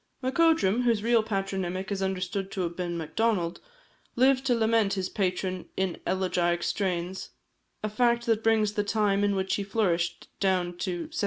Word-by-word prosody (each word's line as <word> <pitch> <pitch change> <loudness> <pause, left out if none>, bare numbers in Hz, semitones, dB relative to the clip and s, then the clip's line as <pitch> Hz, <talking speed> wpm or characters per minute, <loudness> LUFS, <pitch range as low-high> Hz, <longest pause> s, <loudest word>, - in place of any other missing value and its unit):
Macodrum, 265 - +3
whose 230 -4 +1
real 235 0 +4
patronymic 195 -2 -3
is 195 -1 -2
understood 190 0 -2
to 190 - -2
have 170 -1 -2
been 175 -1 -3
Macdonald, 170 +2 0 0.6
lived 260 +1 +4
to 245 - +3
lament 220 -3 +2
his 190 -1 -2
patron 185 -2 -2
in 190 -2 -1
elegiac 175 -2 +1
strains 185 -1 -2 0.5
a - - +1
fact 235 +2 +2
that 225 -2 +1
brings 220 -2 +3
the 205 - 0
time 205 -1 +1
in 205 -1 +2
which 190 0 -1
he 200 - -2
flourished 190 -5 -1
down 180 -2 +1
to 175 -2 -2
1766. - - -5
195 Hz, 165 wpm, -27 LUFS, 185-225 Hz, 0.6 s, real